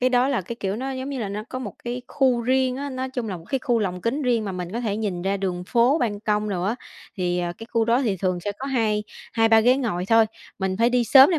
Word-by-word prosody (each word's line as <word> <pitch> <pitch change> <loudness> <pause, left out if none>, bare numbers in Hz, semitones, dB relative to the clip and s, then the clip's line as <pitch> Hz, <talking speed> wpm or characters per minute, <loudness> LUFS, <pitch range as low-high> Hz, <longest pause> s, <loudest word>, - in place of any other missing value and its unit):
Cái 255 0 +3
đó 250 +2 +3
là 270 -7 +1
cái, 230 +6 -7
kiểu, 195 +1 -1
nó 265 +3 -3
giống 260 +1 -4
như 270 - -3
là 210 -4 -2
nó 210 +2 -4
có 255 - -4
một 220 -6 -6
cái 245 +1 -3
khu 255 -3 +2
riêng 255 +1 +2
á, 280 +1 -4
nói 260 0 -3
chung 245 -4 -3
là 185 - -3
một 165 - -12
cái 270 - 0
khu 240 -2 +1
lồng 180 -4 -2
kính 260 +9 -1
riêng 235 -4 +1
mà 195 - -3
mình 180 0 -5
có 235 - -2
thể 210 -3 -1
nhìn 195 -5 -2
ra 195 +1 0
đường 180 -2 -3
phố, 250 +7 +3
ban 205 -6 -1
công 210 0 0
đồ 180 -3 -2
á. 210 +5 +1 0.4
Thì, 180 -1 0
ờ, 175 -1 -1
cái 225 - -8
khu 230 -1 +3
đó 235 +4 +3
thì 210 -7 0
thường 185 -1 -1
sẽ 205 - -3
có 270 - -4
hai 220 -5 +1 0.3
hai 225 0 +3
ba 225 0 +7
ghế 250 +3 +5
ngồi 200 -9 -1
thôi, 225 0 +5 0.3
mình 190 -1 -1
phải 235 +1 +4
đi 245 -1 +2
sớm 270 +6 +8
để 335 - +2
225 Hz, 300 wpm, -24 LUFS, 195-255 Hz, 0.4 s, sớm